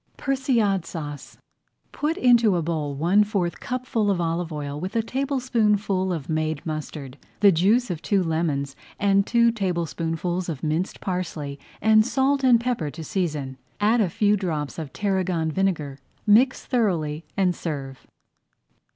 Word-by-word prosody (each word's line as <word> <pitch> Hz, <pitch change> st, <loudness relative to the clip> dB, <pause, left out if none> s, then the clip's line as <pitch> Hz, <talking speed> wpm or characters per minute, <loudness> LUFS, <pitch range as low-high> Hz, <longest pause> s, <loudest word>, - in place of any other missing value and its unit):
PERSILLADE 245 Hz, -, +1 dB
SAUCE 145 Hz, -4 st, -7 dB, 0.5 s
Put 310 Hz, +3 st, -1 dB
into 235 Hz, -5 st, +5 dB
a 170 Hz, -, 0 dB
bowl 155 Hz, -3 st, -2 dB
one 175 Hz, +8 st, +4 dB
fourth 195 Hz, -5 st, -2 dB
cupful 250 Hz, -4 st, -1 dB
of 195 Hz, -3 st, +1 dB
olive 170 Hz, 0 st, -1 dB
oil 145 Hz, -1 st, -4 dB
with 185 Hz, +7 st, -5 dB
a 225 Hz, -, +2 dB
tablespoonful 225 Hz, -8 st, 0 dB
of 160 Hz, -6 st, -4 dB
made 155 Hz, -2 st, -2 dB
mustard, 150 Hz, -3 st, -6 dB, 0.2 s
the 200 Hz, -1 st, +7 dB
juice 205 Hz, +7 st, +2 dB
of 170 Hz, -2 st, -4 dB
two 195 Hz, -3 st, +1 dB
lemons, 155 Hz, -5 st, -1 dB, 0.5 s
two 235 Hz, 0 st, +4 dB
tablespoonfuls 175 Hz, -3 st, -2 dB
of 150 Hz, -5 st, -5 dB
minced 160 Hz, +4 st, -2 dB
parsley, 160 Hz, -6 st, -4 dB, 0.2 s
and 215 Hz, 0 st, +5 dB
salt 270 Hz, +3 st, +1 dB
and 245 Hz, -3 st, +6 dB
pepper 235 Hz, -11 st, -1 dB
to 160 Hz, +3 st, -8 dB
season. 150 Hz, -9 st, -3 dB, 0.2 s
Add 220 Hz, +3 st, +3 dB
a 195 Hz, -, +2 dB
few 210 Hz, +2 st, +2 dB
drops 165 Hz, -7 st, -3 dB
of 155 Hz, -4 st, -6 dB
tarragon 185 Hz, -5 st, -1 dB
vinegar, 155 Hz, -7 st, -1 dB, 0.3 s
mix 240 Hz, +6 st, +4 dB
thoroughly, 170 Hz, -, 0 dB
and 185 Hz, -3 st, +2 dB
serve. 135 Hz, -5 st, -6 dB
180 Hz, 140 wpm, -24 LUFS, 155-220 Hz, 0.5 s, the